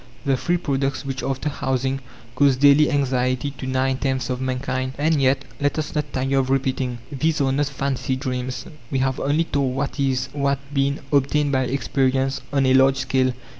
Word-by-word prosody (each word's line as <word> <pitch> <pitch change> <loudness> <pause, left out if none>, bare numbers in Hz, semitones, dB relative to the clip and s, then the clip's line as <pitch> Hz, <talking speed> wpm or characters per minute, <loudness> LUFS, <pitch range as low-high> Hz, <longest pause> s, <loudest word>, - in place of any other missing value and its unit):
The 135 -1 +3
three 175 +7 0
products 140 -3 -1
which, 135 -1 -3
after 135 +2 -2
housing, 130 -1 -1 0.3
cause 140 0 +4
daily 145 +2 +6
anxiety 130 -1 0
to 135 -1 -7
nine 130 0 +1
tenths 130 -2 -1
of 125 0 -3
mankind. 130 0 -2
And 155 0 +2
yet 135 +1 +2
let 145 +1 0
us 155 -2 -3
not 150 -2 -2
tire 135 +1 +1
of 130 -1 0
repeating 130 -2 0
these 155 +3 0
are 135 -2 +2
not 145 +1 +1
fancy 135 -1 -2
dreams. 130 -1 -4 0.2
We 135 - -1
have 130 0 0
only 145 +4 +1
told 140 -5 -1
what 140 +2 -3
is, 130 -1 0
what 140 -1 +1 0.2
been, 140 +1 0
obtained 145 +1 +2
by 130 -1 +2
experience 135 +1 0
on 140 -2 +2
a 130 - +4
large 135 0 +5
scale. 130 -1 +1
135 Hz, 185 wpm, -22 LUFS, 130-140 Hz, 0.3 s, daily